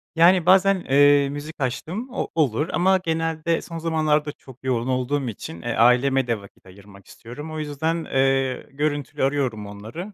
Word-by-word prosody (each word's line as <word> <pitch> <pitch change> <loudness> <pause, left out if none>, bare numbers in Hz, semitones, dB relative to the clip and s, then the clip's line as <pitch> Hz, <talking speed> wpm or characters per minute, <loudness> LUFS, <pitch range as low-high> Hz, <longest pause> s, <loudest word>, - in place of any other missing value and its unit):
Yani, 170 +1 +5
bazen, 190 0 +4
eee, 145 0 +5
müzik 145 +3 -7
açtığım 160 - -3
o - - -2
olur 150 0 +1
ama 190 +2 +3
genelde 165 -1 -1
son 165 - -8
zamanlarda 155 -2 0
çok 130 -3 -17
yoğun 125 -2 -1
olduğum 130 +2 -1
için, 85 -6 -8
eee, 120 - -3
aileme 125 +3 +3
de 115 -2 -1
vakit 100 - -18
ayırmak 100 +1 -16
istiyorum. 145 +7 -10
O 155 - -5
yüzden, 160 +3 -2
eee, 135 -1 0
görüntülü 145 0 -2
arıyorum 135 -6 -1
onları. 110 - -8
145 Hz, 160 wpm, -23 LUFS, 125-165 Hz, -, Yani